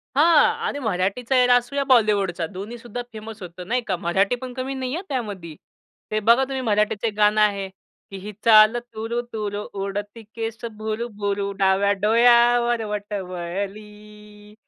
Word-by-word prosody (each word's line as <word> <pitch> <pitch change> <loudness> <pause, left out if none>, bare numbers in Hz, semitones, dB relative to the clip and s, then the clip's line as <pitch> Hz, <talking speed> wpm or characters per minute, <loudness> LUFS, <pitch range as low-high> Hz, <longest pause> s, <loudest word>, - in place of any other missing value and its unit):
हां. 310 +2 +6 0.2
आणि 285 - -3
मराठीचा 220 +3 -1
एरा 245 0 +5
असू 245 +3 -1
या 280 - +1
बॉलिवूडचा 205 -9 +2
दोन्हीसुद्धा 230 +5 -7
फेमस 220 0 -9
होतं 180 0 -9
नाही 245 +3 0
का. 190 - 0
मराठी 190 +6 +1
पण 255 -1 -6
कमी 260 +1 -4
नाही 260 -1 -4
आहे 355 - -4
त्यामध्ये. 205 - -5 0.6
ते 215 - +1
बघा 235 +5 +4
तुम्ही 265 0 -3
मराठीचं 210 -1 0
गाणं 210 0 +4
आहे 200 -2 +1 0.4
की 195 - -8
ही 205 +3 -8
चाल 215 +1 +7
तूरु 235 0 -4
तूरु, 210 -1 -3 0.2
उडती 205 +3 -5
केस 225 0 -4
भुरुभुरु, 210 -2 -3
डाव्या 195 +1 +3
डोळ्यावर 235 +1 +4
बट 210 0 -5
वळली, 210 +3 -7
215 Hz, 145 wpm, -23 LUFS, 200-240 Hz, 0.6 s, चाल